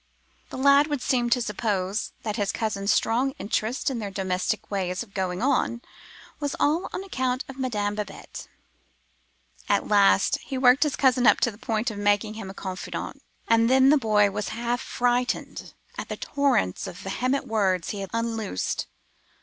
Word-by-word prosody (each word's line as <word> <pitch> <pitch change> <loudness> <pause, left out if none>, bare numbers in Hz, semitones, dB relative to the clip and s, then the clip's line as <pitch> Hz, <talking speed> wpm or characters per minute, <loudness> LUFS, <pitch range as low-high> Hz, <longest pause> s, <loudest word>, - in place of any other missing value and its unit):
The - - -7
lad 280 +2 +5
would 290 -4 -3
seem 245 -3 +1
to 245 0 +2
suppose, 205 -2 -2
that 215 -2 -2
his 205 -2 0
cousin's 200 -2 -1
strong 260 +4 +1
interest 220 +4 -2
in 245 - -3
their 205 -2 -4
domestic 190 +3 -2
ways 185 0 -1
of 205 -4 -19
going 185 +1 -2
on 255 -3 +1 0.6
was 290 -2 -2
all 315 +5 +1
on 380 - -4
account 260 -8 -2
of 270 -1 -10
Madame 210 -6 -1
Babette. 210 -2 -7 1.2
At - - +2
last 95 0 +4
he 265 - -6
worked 255 +1 +5
his 300 -3 +2
cousin 255 -2 +3
up - - +6
to 240 - +2
the 205 - -16
point 225 +1 -1
of 205 - -7
making 205 +1 +1
him 215 -3 -7
a 190 - -9
confidant: 185 -2 -6 0.3
and 230 0 +4
then 265 +1 +6
the - - +6
boy 210 -4 +3
was 210 +1 -3
half 240 +1 -1
frightened 245 0 -1 0.2
at - - -6
the - - -4
torrent 270 - 0
of 175 - -8
vehement 255 +9 -1
words 190 -5 0
he 205 - -5
had 195 -1 -5
unloosed. 225 - -2
225 Hz, 175 wpm, -25 LUFS, 200-255 Hz, 1.2 s, up